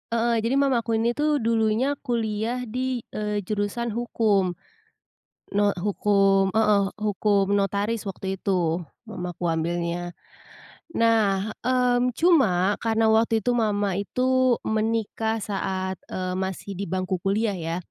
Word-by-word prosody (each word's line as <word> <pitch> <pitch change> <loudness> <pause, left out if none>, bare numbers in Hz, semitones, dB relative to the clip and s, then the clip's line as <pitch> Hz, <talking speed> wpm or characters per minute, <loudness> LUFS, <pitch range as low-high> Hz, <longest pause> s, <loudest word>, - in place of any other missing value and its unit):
heeh, 230 0 +2
jadi 230 +4 0
mama 275 -3 +3
aku 230 0 -1
ini 230 +2 +2
tuh 295 0 0
dulunya 230 +5 +1
kuliah 235 0 -2
di, 250 +1 -3
eee, 210 -1 -2
jurusan 210 +4 -2
hukum. 210 -5 +1 1.0
No 205 0 +3
hukum, 195 0 +2
heeh, 205 -3 +3
hukum 205 -1 +1
notaris 200 +2 0
waktu 190 0 -5
itu, 175 -4 0 0.2
mamaku 175 0 -6
ambilnya. 170 +1 -2 0.8
Nah, 215 -3 +2
mmm, 250 0 +2
cuma 210 - +3
karena 225 0 +1
waktu 225 -1 +2
itu 245 - +2
mama 205 -4 +1
itu 255 +3 +2
menikah 220 0 -1
saat, 190 -3 -3
eee, 185 -1 -3
masih 190 +1 -4
di 195 -1 -5
bangku 185 0 -2
kuliah 205 +3 0
ya. 165 -2 -3
210 Hz, 125 wpm, -25 LUFS, 195-230 Hz, 1.0 s, mama